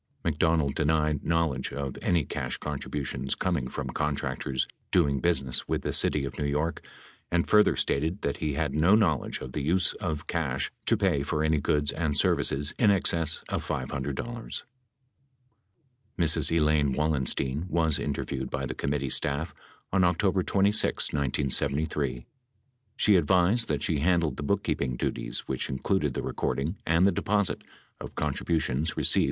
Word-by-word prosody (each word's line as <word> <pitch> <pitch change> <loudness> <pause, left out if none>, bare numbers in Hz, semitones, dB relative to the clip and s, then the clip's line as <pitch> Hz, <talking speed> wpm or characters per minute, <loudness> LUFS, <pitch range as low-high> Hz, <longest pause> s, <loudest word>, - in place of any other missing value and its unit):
McDonald 80 -2 +1
denied 75 -1 +1
knowledge 80 -6 0
of 70 -2 -4
any 85 -3 +2
562 - - -11
cash 60 - -3
contributions 70 -2 -3
coming 85 -9 -1
from - - -5
contractors 70 -2 -2 0.2
doing 70 -6 +2
business 65 -6 0
with - - -1
the - - -2
city 70 -2 +3
of 70 - -7
New 75 - -1
York 75 +3 -1 0.5
and 85 -1 +1
further 105 0 +5
stated 80 +7 -1
that 70 - -1
he 75 -3 -2
had 75 -2 -1
no 80 +7 +4
knowledge 80 - +1
of 65 - -7
the 75 - -3
use 85 +6 +2
of 80 -5 -4
cash 70 -6 -2 0.2
to - - +4
pay 70 - +1
for 75 +2 -1
any 80 -1 +2
goods 75 0 +1
and 75 -3 -1
services 70 +2 +2
in 110 - +5
excess 85 -5 +2
of - - -3
$500. 70 - -4 1.5
Mrs. 80 -2 +3
Elaine 75 -3 +2
Wallenstein 70 +1 0
was 80 -4 +1
interviewed 70 -2 -3
by 65 - -3
the 65 - -4
committee 70 0 -2
staff 70 +5 +1 0.4
on 95 -2 +4
October 95 +2 +2
26, 100 +3 +2
1973. 70 -1 0 0.7
She 105 -3 +4
advised 95 +8 +3
that - - -1
she 80 -7 0
handled 85 0 +1
the - - -4
bookkeeping 75 -7 -1
duties - - -3
which 65 -1 -2
included 70 +1 -1
the - - -2
recording 80 +8 -2
and 80 +3 +4
the 100 - +5
deposit 105 -1 0 0.4
of - - -9
contributions 80 -1 -1
received - - +4
75 Hz, 150 wpm, -27 LUFS, 70-85 Hz, 1.5 s, further